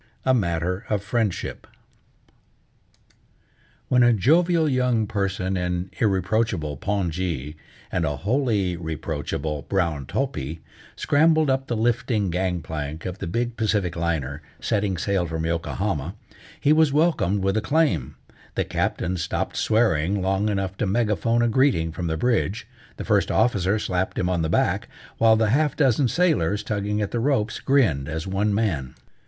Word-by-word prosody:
A 130 Hz, -, +4 dB
MATTER 90 Hz, -3 st, 0 dB
OF 105 Hz, -2 st, 0 dB
FRIENDSHIP 110 Hz, -4 st, -2 dB, 2.2 s
When 125 Hz, -1 st, +3 dB
a 120 Hz, 0 st, +6 dB
jovial 160 Hz, -, +3 dB
young 125 Hz, -5 st, +1 dB
person 95 Hz, -2 st, -2 dB
in 90 Hz, 0 st, -2 dB
irreproachable 95 Hz, -, 0 dB
pongee, 85 Hz, -6 st, -2 dB, 0.4 s
and 85 Hz, -, 0 dB
a 75 Hz, -2 st, 0 dB
wholly 105 Hz, -, 0 dB
reproachable 80 Hz, -2 st, -4 dB
brown 85 Hz, -8 st, 0 dB
topi, 80 Hz, -, -3 dB, 0.4 s
scrambled 155 Hz, 0 st, +3 dB
up 135 Hz, 0 st, -1 dB
the 120 Hz, -, -1 dB
lifting 115 Hz, -3 st, 0 dB
gang 90 Hz, -1 st, -1 dB
plank 80 Hz, 0 st, -5 dB
of 90 Hz, 0 st, -5 dB
the -, -, -4 dB
big 120 Hz, +6 st, -2 dB
Pacific 105 Hz, -6 st, 0 dB
liner, 80 Hz, -4 st, -2 dB, 0.2 s
setting 100 Hz, -3 st, 0 dB
sail 95 Hz, 0 st, 0 dB
from 80 Hz, 0 st, -3 dB
Yokohama, 85 Hz, 0 st, -2 dB, 0.4 s
he 145 Hz, -, +4 dB
was 155 Hz, -2 st, +4 dB
welcomed 115 Hz, -, +2 dB
with 95 Hz, +1 st, +1 dB
acclaim. 150 Hz, +7 st, +1 dB, 0.4 s
The -, -, 0 dB
Captain 90 Hz, +1 st, -1 dB
stopped 85 Hz, 0 st, -2 dB
swearing 100 Hz, -4 st, +2 dB
long 95 Hz, +3 st, 0 dB
enough 95 Hz, -2 st, -2 dB
to -, -, 0 dB
megaphone 115 Hz, +2 st, +1 dB
a -, -, +3 dB
greeting 115 Hz, -, +2 dB
from 85 Hz, +2 st, -4 dB
the 80 Hz, 0 st, -1 dB
bridge, 115 Hz, 0 st, 0 dB, 0.3 s
the -, -, -5 dB
First -, -, +2 dB
Officer 105 Hz, -3 st, +2 dB
slapped 95 Hz, -3 st, -2 dB
him 90 Hz, -, 0 dB
on 90 Hz, -2 st, 0 dB
the 80 Hz, -, -1 dB
back, -, -, +1 dB, 0.3 s
while 110 Hz, -1 st, +6 dB
the 110 Hz, -1 st, +2 dB
half 150 Hz, +2 st, +2 dB
dozen 135 Hz, -2 st, +3 dB
sailors, 110 Hz, -, +1 dB
tugging 105 Hz, 0 st, -1 dB
at 100 Hz, -, -3 dB
the 120 Hz, -, -1 dB
ropes, 115 Hz, -4 st, 0 dB
grinned 100 Hz, -, +2 dB
as 80 Hz, +1 st, -4 dB
one 100 Hz, +2 st, 0 dB
man. 90 Hz, -, -1 dB
100 Hz, 150 wpm, -24 LUFS, 85-120 Hz, 2.2 s, a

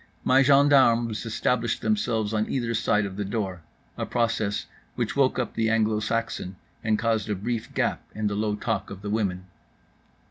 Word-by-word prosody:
My 130 Hz, +1 st, +5 dB
gendarmes 130 Hz, -5 st, +4 dB
established 115 Hz, +1 st, 0 dB
themselves 115 Hz, -, 0 dB
on 110 Hz, 0 st, 0 dB
either 120 Hz, -3 st, -1 dB
side 110 Hz, -2 st, +1 dB
of 95 Hz, -1 st, -6 dB
the 105 Hz, -, -1 dB
door, 95 Hz, -3 st, -3 dB, 0.4 s
a -, -, 0 dB
process 115 Hz, -4 st, 0 dB, 0.3 s
which -, -, -2 dB
woke -, -, +3 dB
up -, -, -2 dB
the 110 Hz, -1 st, +1 dB
Anglo 110 Hz, -1 st, +2 dB
Saxon 110 Hz, -4 st, -2 dB, 0.3 s
and 110 Hz, -1 st, +2 dB
caused 110 Hz, -2 st, 0 dB
a 105 Hz, -, 0 dB
brief 115 Hz, +4 st, -3 dB
gap -, -, 0 dB
in 110 Hz, 0 st, -2 dB
the 105 Hz, -, +1 dB
low 105 Hz, 0 st, 0 dB
talk -, -, -2 dB
of 100 Hz, 0 st, -9 dB
the 105 Hz, -, -3 dB
women. 95 Hz, -4 st, -1 dB
110 Hz, 175 wpm, -26 LUFS, 105-115 Hz, 0.4 s, My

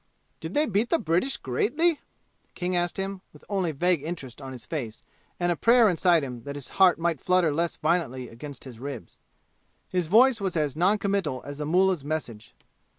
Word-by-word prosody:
"Did 160 Hz, +3 st, -7 dB
they 300 Hz, -, +3 dB
beat 215 Hz, -1 st, 0 dB
the 335 Hz, -, +3 dB
British 175 Hz, -, +1 dB
greatly?" 295 Hz, -, +1 dB, 0.5 s
King 180 Hz, 0 st, -2 dB
asked 175 Hz, -1 st, -1 dB
him, 195 Hz, 0 st, -4 dB
with -, -, -18 dB
only 190 Hz, -5 st, 0 dB
vague 170 Hz, +2 st, +1 dB
interest 145 Hz, -5 st, -7 dB
on 135 Hz, -1 st, -7 dB
his 125 Hz, -4 st, -8 dB
face 120 Hz, -9 st, -5 dB, 0.4 s
and 175 Hz, 0 st, +1 dB
a -, -, +1 dB
prayer 235 Hz, +4 st, +5 dB
inside 175 Hz, -3 st, +3 dB
him 125 Hz, -3 st, -6 dB
that 140 Hz, +4 st, -7 dB
his 145 Hz, -2 st, -7 dB
heart 185 Hz, -2 st, +7 dB
might 165 Hz, -4 st, -1 dB
flutter 180 Hz, -4 st, +2 dB
less 170 Hz, +2 st, -1 dB
violently 155 Hz, -6 st, -1 dB
against 130 Hz, +4 st, -9 dB
his 125 Hz, -4 st, -10 dB
ribs. 130 Hz, -8 st, -8 dB, 0.7 s
His 180 Hz, -3 st, -1 dB
voice 230 Hz, +5 st, +5 dB
was 190 Hz, -3 st, -1 dB
as 150 Hz, -3 st, 0 dB
non 185 Hz, +6 st, +3 dB
committal 195 Hz, -10 st, -1 dB
as 145 Hz, +1 st, -8 dB
the 150 Hz, -, -3 dB
mullah's 180 Hz, -1 st, +2 dB
message. 120 Hz, -, -5 dB
170 Hz, 190 wpm, -26 LUFS, 140-190 Hz, 0.7 s, heart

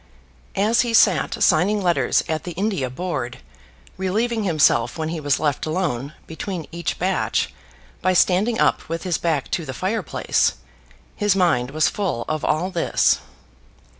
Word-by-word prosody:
As 215 Hz, +4 st, +3 dB
he 235 Hz, -2 st, 0 dB
sat 190 Hz, -6 st, +3 dB
signing 195 Hz, +7 st, +3 dB
letters 175 Hz, -3 st, +2 dB
at 160 Hz, -1 st, -2 dB
the 175 Hz, -, -6 dB
India 190 Hz, -7 st, -1 dB
Board, 130 Hz, -4 st, -4 dB, 0.6 s
relieving 215 Hz, +4 st, -1 dB
himself 140 Hz, -8 st, +2 dB
when 160 Hz, -1 st, -2 dB
he 165 Hz, 0 st, -3 dB
was 145 Hz, -2 st, +1 dB
left 150 Hz, -1 st, -1 dB
alone 155 Hz, -5 st, -2 dB
between 165 Hz, +1 st, -5 dB
each 170 Hz, -1 st, -3 dB
batch 185 Hz, +2 st, 0 dB, 0.5 s
by 185 Hz, -, +2 dB
standing 195 Hz, +6 st, +3 dB
up -, -, +1 dB
with 165 Hz, 0 st, -3 dB
his 180 Hz, -4 st, -1 dB
back 160 Hz, -5 st, -1 dB
to 170 Hz, -, -1 dB
the 130 Hz, -3 st, -6 dB
fire 200 Hz, +5 st, -1 dB
place, -, -, +1 dB, 0.6 s
his 205 Hz, -2 st, +2 dB
mind 165 Hz, -10 st, +2 dB
was 155 Hz, +2 st, +2 dB
full 180 Hz, -, -2 dB
of 155 Hz, -1 st, -2 dB
all 170 Hz, +5 st, 0 dB
this. 170 Hz, -3 st, +2 dB
170 Hz, 155 wpm, -22 LUFS, 155-190 Hz, 0.6 s, As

